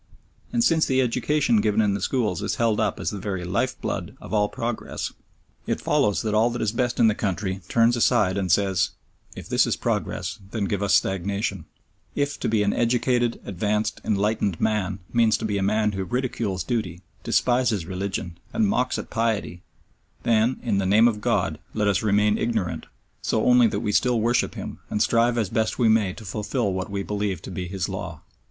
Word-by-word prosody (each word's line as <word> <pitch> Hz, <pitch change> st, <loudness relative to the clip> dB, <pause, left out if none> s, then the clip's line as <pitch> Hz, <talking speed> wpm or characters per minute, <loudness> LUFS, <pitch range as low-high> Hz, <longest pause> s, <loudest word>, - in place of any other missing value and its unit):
And 235 Hz, -1 st, +2 dB
since 165 Hz, -6 st, +3 dB
the 130 Hz, 0 st, +2 dB
education 125 Hz, -1 st, +2 dB
given 105 Hz, 0 st, +1 dB
in 105 Hz, -2 st, +3 dB
the 100 Hz, -, -3 dB
schools 110 Hz, -10 st, 0 dB
is -, -, -1 dB
held 115 Hz, -3 st, +1 dB
up 110 Hz, -, 0 dB
as -, -, -2 dB
the 100 Hz, -, -5 dB
very 95 Hz, -2 st, -3 dB
life 90 Hz, -, -1 dB
blood -, -, -4 dB
of -, -, -9 dB
all 105 Hz, -1 st, +2 dB
progress, 115 Hz, 0 st, -4 dB, 0.5 s
it -, -, 0 dB
follows 105 Hz, -1 st, +1 dB
that 110 Hz, -1 st, -1 dB
all 110 Hz, +2 st, +4 dB
that 120 Hz, 0 st, -4 dB
is 110 Hz, -, +1 dB
best 120 Hz, +1 st, -1 dB
in 115 Hz, -, +6 dB
the 110 Hz, -, +4 dB
country 95 Hz, -2 st, -2 dB
turns 115 Hz, +1 st, +4 dB
aside 100 Hz, -5 st, +3 dB
and 95 Hz, -3 st, -1 dB
says, 95 Hz, -1 st, +2 dB, 0.4 s
"If -, -, -8 dB
this -, -, +3 dB
is -, -, +1 dB
progress, -, -, -2 dB
then 105 Hz, -1 st, -2 dB
give 100 Hz, 0 st, -2 dB
us 100 Hz, -1 st, +3 dB
stagnation; 95 Hz, -1 st, -1 dB, 0.5 s
if 145 Hz, 0 st, -1 dB
to -, -, -1 dB
be 110 Hz, -2 st, +2 dB
an 100 Hz, -, +1 dB
'educated,' 120 Hz, 0 st, +1 dB
'advanced,' 105 Hz, +3 st, -1 dB
'enlightened' 105 Hz, -3 st, 0 dB
man 105 Hz, -3 st, 0 dB, 0.2 s
means 115 Hz, -2 st, +4 dB
to 115 Hz, -, -4 dB
be 105 Hz, -2 st, -1 dB
a -, -, -2 dB
man 105 Hz, +2 st, +2 dB
who 95 Hz, -1 st, -3 dB
ridicules 115 Hz, -4 st, -2 dB
duty, 100 Hz, -8 st, -3 dB, 0.2 s
despises 120 Hz, -7 st, +1 dB
religion, 95 Hz, -2 st, -4 dB
and 220 Hz, -1 st, +2 dB
mocks 130 Hz, -10 st, 0 dB
at -, -, -7 dB
piety, 110 Hz, -6 st, -1 dB, 0.6 s
then, 115 Hz, +2 st, +2 dB
in 100 Hz, -5 st, +1 dB
the 95 Hz, -, 0 dB
name 110 Hz, +4 st, +6 dB
of 105 Hz, -3 st, -1 dB
God, -, -, 0 dB, 0.2 s
let 105 Hz, -1 st, +1 dB
us 100 Hz, -1 st, +2 dB
remain 105 Hz, 0 st, +2 dB
ignorant 110 Hz, -7 st, -2 dB, 0.3 s
so 110 Hz, -, 0 dB
only 125 Hz, -1 st, +6 dB
that 100 Hz, -1 st, -2 dB
we 105 Hz, -, -1 dB
still 120 Hz, +2 st, +2 dB
worship 120 Hz, +3 st, +1 dB
Him, -, -, -7 dB
and 105 Hz, -, -1 dB
strive 120 Hz, +2 st, +3 dB
as 110 Hz, -5 st, 0 dB
best 110 Hz, +1 st, 0 dB
we 120 Hz, -3 st, +3 dB
may 110 Hz, -4 st, +3 dB
to 110 Hz, -, -11 dB
fulfil 105 Hz, +2 st, -2 dB
what 95 Hz, 0 st, -3 dB
we 100 Hz, 0 st, -3 dB
believe 100 Hz, -4 st, -2 dB
to -, -, -7 dB
be 90 Hz, 0 st, -4 dB
His 90 Hz, -2 st, -3 dB
law!" 95 Hz, -4 st, -6 dB
105 Hz, 200 wpm, -24 LUFS, 100-115 Hz, 0.6 s, in